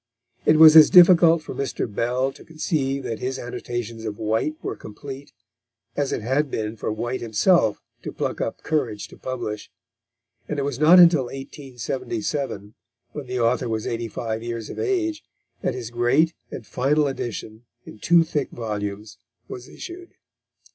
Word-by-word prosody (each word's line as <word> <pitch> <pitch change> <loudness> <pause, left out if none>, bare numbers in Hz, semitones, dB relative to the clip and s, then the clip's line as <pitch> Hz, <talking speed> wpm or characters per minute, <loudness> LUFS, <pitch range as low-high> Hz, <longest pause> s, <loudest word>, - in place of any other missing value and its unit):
It 155 - +6
was 160 0 +9
as 155 -1 +10
difficult 170 -3 +7
for - - -7
Mr. 140 - -3
Bell 125 +5 -1
to - - -15
conceive 145 -4 -2
that 115 - -4
his 130 +1 -3
annotations 120 -2 -6
of 105 -2 -5
White 110 +8 -1
were - - -3
complete, 135 +6 -10 0.6
as 145 -2 -1
it - - -3
had 135 +5 0
been 110 -2 -3
for 110 - -3
White 120 +4 -3
himself 110 - +2 0.2
to - - -6
pluck - - -3
up - - -4
courage 125 -10 -2
to - - -13
publish; 110 -5 -5 0.8
and 150 - -3
it 140 - -1
was 140 -2 -3
not 165 +4 +7
until 170 -6 +6
1877, 130 -4 -5 0.4
when 145 -3 -7
the 125 0 -3
author 120 +1 +1
was 110 -1 -2
eighty 115 0 -3
five 110 0 -4
years 115 -1 -5
of - - -8
age, 330 -6 -1 0.4
that 125 - -1
his 120 -2 -6
great 130 +8 +2 0.2
and 115 - -8
final 145 +6 +1
edition 115 -3 -6 0.2
in 110 - -12
two 170 +7 +4
thick 150 -4 -2
volumes 105 -2 -5 0.3
was 125 0 -9
issued. 350 0 -10
130 Hz, 160 wpm, -23 LUFS, 115-150 Hz, 0.8 s, as